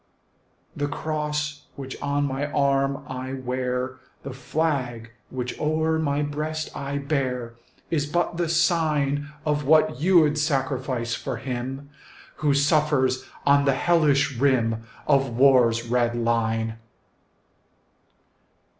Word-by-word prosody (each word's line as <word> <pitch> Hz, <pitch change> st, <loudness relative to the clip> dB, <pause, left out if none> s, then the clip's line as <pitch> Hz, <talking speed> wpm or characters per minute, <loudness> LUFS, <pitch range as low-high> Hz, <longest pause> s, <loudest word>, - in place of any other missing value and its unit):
The 145 Hz, 0 st, -1 dB
cross 150 Hz, 0 st, -3 dB
which 135 Hz, -1 st, -7 dB
on 145 Hz, 0 st, 0 dB
my 140 Hz, +2 st, -2 dB
arm 140 Hz, -1 st, +1 dB
I 130 Hz, 0 st, -5 dB
wear, 130 Hz, 0 st, -3 dB, 0.2 s
The 140 Hz, -, -6 dB
flag 130 Hz, -5 st, -2 dB, 0.2 s
which 125 Hz, -1 st, -5 dB
o'er 160 Hz, +1 st, +1 dB
my 145 Hz, -1 st, 0 dB
breast 155 Hz, +2 st, -4 dB
I 140 Hz, 0 st, -3 dB
bear, 130 Hz, -5 st, -2 dB, 0.4 s
Is 150 Hz, -3 st, 0 dB
but 175 Hz, +2 st, -1 dB
the 170 Hz, -2 st, 0 dB
sign 150 Hz, -4 st, +1 dB, 0.2 s
Of 150 Hz, -1 st, 0 dB
what 155 Hz, -3 st, +3 dB
you 170 Hz, -1 st, +5 dB
'd 150 Hz, +1 st, -1 dB
sacrifice 130 Hz, -5 st, -1 dB
for 130 Hz, 0 st, -4 dB
him 130 Hz, +3 st, -5 dB, 0.5 s
Who 145 Hz, -2 st, +2 dB
suffers 145 Hz, -3 st, +2 dB, 0.2 s
on 140 Hz, 0 st, +4 dB
the 135 Hz, -2 st, +3 dB
hellish 150 Hz, -4 st, +2 dB
rim 115 Hz, -5 st, +1 dB, 0.2 s
Of 135 Hz, -2 st, +3 dB
war's 120 Hz, -3 st, +4 dB
red 120 Hz, 0 st, +1 dB
line. 115 Hz, -1 st, 0 dB
140 Hz, 120 wpm, -24 LUFS, 130-150 Hz, 0.5 s, you